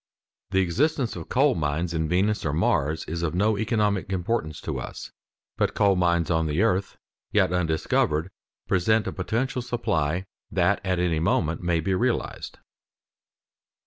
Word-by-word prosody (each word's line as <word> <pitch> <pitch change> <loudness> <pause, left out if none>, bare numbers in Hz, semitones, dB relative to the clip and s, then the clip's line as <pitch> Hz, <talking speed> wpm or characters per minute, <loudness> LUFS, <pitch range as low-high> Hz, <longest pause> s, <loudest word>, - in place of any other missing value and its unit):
The 95 -1 +2
existence 130 - 0
of 85 -3 -8
coal 135 +2 +3
mines 80 +2 -1
in 80 -1 -1
Venus 100 +5 +1
or 75 - -1
Mars 75 0 +1
is 85 +1 -4
of 85 0 -1
no 105 +4 +2
economic 105 -3 0
importance 90 -4 -2
to - - -3
us, - - -7 0.5
but - - 0
coal 100 -1 +4
mines 85 -2 +1
on 80 -1 +1
the 75 +7 +1
earth, 100 -3 0 0.3
yet 90 - +3
undiscovered, 80 0 0 0.4
present 105 +4 +2
a - - -2
potential 120 +7 -2
supply 95 -9 -1 0.2
that - - +2
at 95 -1 0
any 85 -3 +1
moment 80 -1 +1
may 85 -2 +1
be 95 +4 0
realized. 120 +6 -1
90 Hz, 150 wpm, -25 LUFS, 80-105 Hz, 0.5 s, coal